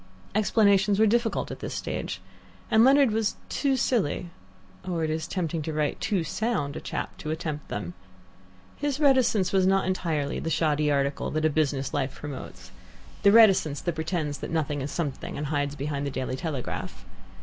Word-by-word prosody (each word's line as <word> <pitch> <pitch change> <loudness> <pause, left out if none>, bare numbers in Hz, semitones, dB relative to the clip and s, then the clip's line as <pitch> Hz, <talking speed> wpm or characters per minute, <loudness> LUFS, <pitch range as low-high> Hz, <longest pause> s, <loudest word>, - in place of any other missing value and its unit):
Explanations 200 -1 +3
were 220 - +5
difficult 230 +1 +1
at - - -7
this - - -5
stage, - - -4 0.5
and 220 +1 +6
Leonard 270 -1 +6
was 220 -1 0
too 275 -2 +1
silly 180 - 0 0.5
or 170 -3 -2
it 155 - 0
is 160 0 -2
tempting 170 -3 -2
to 160 - -3
write, 150 -1 -1
too 200 -6 0
sound 160 -5 -2
a - - -5
chap - - -4
to 155 - -5
attempt 155 -2 -4
them. 90 -4 -5 0.8
His 290 -1 -2
reticence 255 -10 +3
was 190 -1 +4
not 195 0 +3
entirely 160 -6 -1
the 165 - -3
shoddy 150 -2 +1
article 140 -1 0
that 155 0 -1
a 155 - +3
business 140 -3 0
life 130 - -1
promotes, 95 -10 -8 0.5
the 200 - +6
reticence 195 -10 +5
that 175 - -1
pretends 160 -2 -2
that - - -5
nothing 150 -3 -1
is 135 - -3
something, 150 -6 -4
and 150 - -3
hides 145 -1 -1
behind 145 0 -3
the - - -1
DAILY 130 -1 -3
TELEGRAPH. 145 - -5
160 Hz, 175 wpm, -27 LUFS, 145-200 Hz, 0.8 s, and